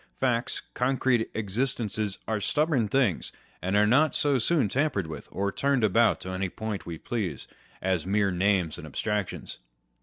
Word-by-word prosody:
Facts, 125 -2 0
concrete 125 -2 +1
existences, 110 -1 -1
are 110 -1 0
stubborn 145 - +1
things, 115 - +1 0.3
and 95 +2 -1
are 105 0 +5
not 145 +8 +4
so 140 -3 +2
soon 145 +1 +2
tampered 130 - 0
with 80 -2 -8
or 100 +1 -1
turned 140 +1 +1
about 115 +3 +4
to 95 - -6
any 95 0 -2
point 110 0 -5
we 85 -1 -5
please, 105 0 -3 0.4
as 95 -3 +1
mere 100 +1 +1
names 90 -3 +1
and 75 - -8
abstractions. 105 +5 -3
105 Hz, 155 wpm, -27 LUFS, 95-125 Hz, 0.4 s, are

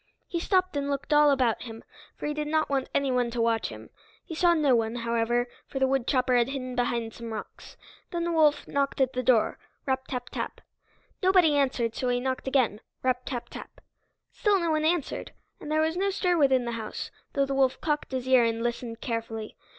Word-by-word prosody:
He 340 - -2
stopped 370 -1 +1
and 285 0 -1
looked 280 +2 -1
all 295 0 +6
about 255 -5 +2
him, 225 -2 -8 0.3
for - - -6
he 295 - -1
did 300 0 -3
not 310 -1 +1
want 270 -2 0
anyone 250 -3 +1
to 235 0 -4
watch 230 -1 +1
him. - - -11 0.3
He 340 - -7
saw 345 +1 +4
no 290 -5 +4
one, 225 0 0
however, 235 +1 0 0.2
for - - -6
the 265 - +3
woodchopper 260 -1 +1
had 240 -1 +4
hidden 255 -2 -4
behind 235 -2 -1
some 230 -1 -7
rocks. 220 - -8 0.3
Then 340 -1 -2
the 340 - -1
wolf 310 -3 +3
knocked 280 0 -1
at 265 -1 +2
the 255 - -1
door, 245 -3 +2 0.3
rap 265 -1 -1
tap 250 -2 -4
tap! - - -5 0.6
Nobody 365 -5 +5
answered, 255 -5 +1
so 250 - -2
he 245 0 +1
knocked 260 +1 -3
again, 255 -6 +1 0.2
rap 255 -1 +1
tap 245 -3 -4
tap! - - -10 0.5
Still 410 -3 +2
no 340 -2 0
one 310 0 +1
answered, 330 -2 -1 0.3
and 300 - -7
there 310 0 +3
was 320 +1 +1
no 390 +2 +1
stir 360 -2 +1
within 265 -5 +3
the 235 - -2
house, 225 -2 -5 0.2
though 275 -1 +2
the 275 - -3
wolf 265 -1 +2
cocked 300 -2 -1
his 260 -1 -3
ear 260 -2 +6
and 230 0 0
listened 235 -1 -3
carefully. 225 -2 -4
260 Hz, 210 wpm, -27 LUFS, 240-300 Hz, 0.6 s, all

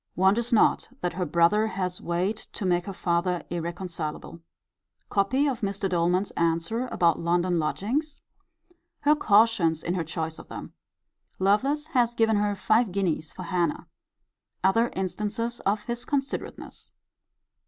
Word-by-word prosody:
Wonders 205 +6 +2
not 225 - +3
that 175 - -1
her 180 +1 -2
brother 170 +7 +3
has 185 -3 -2
weight 180 +5 -2
to 200 - -4
make 175 +1 +1
her - - -3
father 175 0 0
irreconcilable. 170 -2 -5 0.7
Copy 235 +8 +2
of 255 -3 -2
Mr. 200 -1 -1
Doleman's 180 +2 +1
answer 170 +9 0
about 170 -8 +2
London 175 +1 +1
lodgings. 250 - -1 0.8
Her 295 +1 +5
caution 210 - +4
in 175 - 0
her 180 -2 -1
choice 160 0 -4
of - - -12
them. - - -8 0.6
Lovelace 265 +10 +2
has 240 -2 +2
given 225 -2 +3
her 205 0 +1
five 220 +2 +2
guineas 175 -5 -1
for 185 - -8
Hannah. 170 -3 -1 0.8
Other 225 +5 +3
instances 210 +5 -2
of 205 +1 +1
his 235 +2 -4
considerateness. 275 -2 -4
190 Hz, 135 wpm, -26 LUFS, 175-225 Hz, 0.8 s, Her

